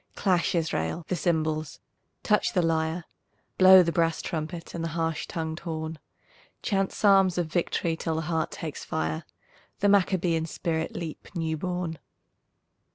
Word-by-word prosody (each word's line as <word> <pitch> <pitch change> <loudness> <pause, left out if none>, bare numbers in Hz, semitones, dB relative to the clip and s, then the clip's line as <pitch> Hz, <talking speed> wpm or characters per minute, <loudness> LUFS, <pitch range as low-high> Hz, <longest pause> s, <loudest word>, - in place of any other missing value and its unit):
Clash, 180 -3 +1
Israel, 160 - -1
the 180 - +1
cymbals, 155 -3 -1 0.4
touch 210 -1 +2
the 180 - +2
lyre, 160 +1 0 0.5
Blow 185 0 +9
the 170 - 0
brass 165 -1 +1
trumpet 165 +1 -4
and 170 - -4
the - - -1
harsh 165 -1 -1
tongued 160 -1 -4
horn; 160 -1 -5 0.6
Chant 195 -3 +1
psalms 195 -3 +4
of 175 - +1
victory 165 0 -1
till 165 0 -2
the 160 - -1
heart 160 0 -1
takes 155 -3 -6
fire, 80 0 -2 0.5
The 205 - +3
Maccabean 180 -4 +2
spirit 160 -1 -2
leap 165 -3 -6
new 160 -2 -1
born. 175 -1 -3
165 Hz, 145 wpm, -27 LUFS, 160-180 Hz, 0.6 s, Blow